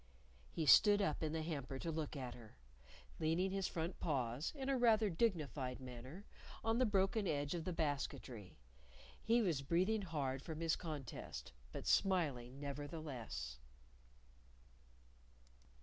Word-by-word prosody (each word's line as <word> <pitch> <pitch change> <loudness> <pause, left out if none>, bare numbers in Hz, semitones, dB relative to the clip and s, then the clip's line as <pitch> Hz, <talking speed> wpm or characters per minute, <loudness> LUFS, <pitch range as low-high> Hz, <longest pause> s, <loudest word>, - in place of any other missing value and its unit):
He 160 - -2
stood 205 +7 +8
up 195 -7 +1
in 155 -1 0
the 160 0 -1
hamper 140 -5 -3
to 165 +5 -3
look 155 -1 -3
at 130 -3 -4
her, 115 - -13 0.6
leaning 165 +4 +2
his 195 -1 0
front 165 +2 -3
paws 130 -1 -1
in 270 -2 -4
rather 225 -2 +5
a - - +2
dignified 150 - 0
manner 130 - -8 0.4
on 225 +1 +2
the 255 - +4
broken 200 +1 +2
edge 145 -1 0
of 170 -2 -3
the 185 - -1
basketry. 140 - -3 0.6
He 230 +1 +4
was 165 -8 +1
breathing 185 +9 +2
hard 140 -7 -2
from 160 0 -6
his 165 -1 +2
contest, 150 - -6 0.2
but - - -6
smiling 140 -9 +2
nevertheless. 140 - -5
155 Hz, 135 wpm, -39 LUFS, 135-185 Hz, 0.6 s, stood